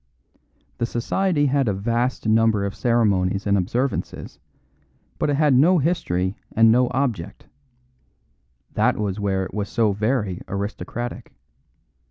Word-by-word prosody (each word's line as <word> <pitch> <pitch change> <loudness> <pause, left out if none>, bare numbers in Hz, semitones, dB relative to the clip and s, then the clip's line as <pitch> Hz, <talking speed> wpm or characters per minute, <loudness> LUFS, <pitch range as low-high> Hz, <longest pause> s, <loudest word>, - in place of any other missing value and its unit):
The 120 - 0
society 145 +7 0
had 140 -2 +1
a 105 - +1
vast 120 +4 -1
number 110 -2 +3
of 100 - -3
ceremonies 100 -5 +1
and 100 -1 +2
observances, 120 +8 -2 0.8
but - - 0
it 145 - +2
had 150 -1 +3
no 160 +9 +5
history 100 - 0 0.2
and 115 0 +5
no 125 +2 +4
object; 115 -9 -3 1.3
that - - +2
was 105 -1 -2
where 95 -2 0
it - - -10
was 105 -1 -3
so 115 -4 +2
very 105 -2 -1
aristocratic. 100 +4 -5
115 Hz, 130 wpm, -22 LUFS, 100-130 Hz, 1.3 s, no